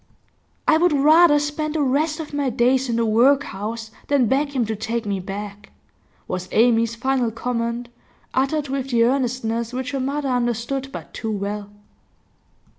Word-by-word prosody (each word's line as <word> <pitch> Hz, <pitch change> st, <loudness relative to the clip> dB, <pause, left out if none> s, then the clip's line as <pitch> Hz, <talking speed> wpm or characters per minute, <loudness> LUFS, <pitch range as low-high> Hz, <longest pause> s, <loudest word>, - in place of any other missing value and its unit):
'I 315 Hz, -, +6 dB
would 345 Hz, 0 st, +3 dB
rather 305 Hz, +2 st, +6 dB
spend 295 Hz, +1 st, -2 dB
the 305 Hz, -, +2 dB
rest 300 Hz, +4 st, +1 dB
of 310 Hz, -2 st, -7 dB
my 285 Hz, -2 st, 0 dB
days 250 Hz, +2 st, +2 dB
in 235 Hz, -, 0 dB
the 230 Hz, 0 st, +1 dB
workhouse 225 Hz, -2 st, +1 dB, 0.2 s
than 280 Hz, -3 st, +3 dB
beg 280 Hz, +4 st, 0 dB
him 245 Hz, -3 st, +2 dB
to 220 Hz, 0 st, -3 dB
take 225 Hz, +2 st, -3 dB
me 200 Hz, -2 st, -1 dB
back,' 200 Hz, +1 st, -7 dB, 0.6 s
was 185 Hz, 0 st, -4 dB
Amy's 230 Hz, 0 st, +3 dB
final 255 Hz, 0 st, 0 dB
comment, 235 Hz, +1 st, -3 dB, 0.5 s
uttered 280 Hz, +3 st, 0 dB
with 270 Hz, 0 st, -3 dB
the 235 Hz, -2 st, +3 dB
earnestness 240 Hz, -2 st, 0 dB
which 260 Hz, +2 st, -3 dB
her 275 Hz, -, -2 dB
mother 275 Hz, +2 st, -2 dB
understood 245 Hz, +2 st, -1 dB
but -, -, -9 dB
too 225 Hz, -, -4 dB
well. 205 Hz, 0 st, -4 dB
250 Hz, 160 wpm, -22 LUFS, 225-280 Hz, 0.6 s, I